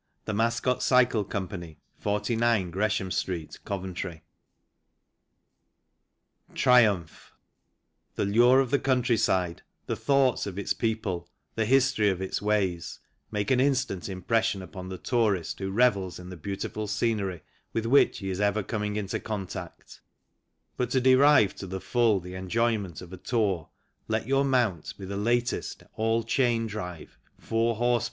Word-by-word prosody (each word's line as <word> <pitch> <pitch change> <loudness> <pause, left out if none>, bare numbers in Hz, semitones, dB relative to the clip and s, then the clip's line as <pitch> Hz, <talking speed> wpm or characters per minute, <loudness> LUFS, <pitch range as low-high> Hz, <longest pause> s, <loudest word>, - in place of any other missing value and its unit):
I - - -47
THE - - -3
MASCOT 115 +3 +1
CYCLE 120 -5 +3
COMPANY 90 -5 -5 0.2
49 105 -2 +1
Gresham 100 0 0
Street 85 -3 -3
COVENTRY 90 -3 -5 2.3
lillllllllllllllllllllllllllllllllllllllllllllli 110 -9 +5
*J| 80 - -20 0.8
The - - 0
lure 120 +6 +5
of 130 -3 -2
the 140 - +3
countryside, 115 -9 +1 0.2
the - - -2
thoughts 135 -5 +2
of 95 -1 -6
its 100 - -1
people, 110 -6 -2 0.2
the 110 -1 -1
history 130 -5 +3
of 95 -2 -1
its 95 0 -3
ways, 100 -5 0 0.3
make 105 +1 -1
an 130 - +4
instant 130 -9 0
im 95 -1 -6
pression 115 -2 +1
upon 95 0 -8
the 95 - -5
tourist 105 -7 0
who 95 -1 -3
revels 100 -4 +2
in 90 0 -10
the 90 - -7
beauti 95 +5 -4
ful 110 0 -4
scenery 105 -5 -1 0.3
with 115 0 -2
which 135 +5 +4
he 95 -1 -4
is 95 +2 -3
ever 105 +1 +1
coining 105 -1 -3
in 105 -2 -2
contact 100 -1 -5
^| - - -13 0.8
But 125 -2 0
to 130 - +2
derive 130 -4 +5
to 95 - -6
the 95 +1 -4
full 110 +2 +2
the 90 0 -9
enjoyment 95 -2 -1
of 90 0 -11
a - - -7
tour 100 - -1 0.4
let 110 0 -1
your 135 +1 +2
mount 120 - 0
be 95 - -8
the 100 +1 -5
latest 120 +4 -1
All 115 +1 +1
Chain 115 0 +1
Drive 90 -6 -7 0.2
4 115 +1 0
h. - - -11
p. 120 +1 +2
105 Hz, 155 wpm, -27 LUFS, 95-120 Hz, 2.3 s, lillllllllllllllllllllllllllllllllllllllllllllli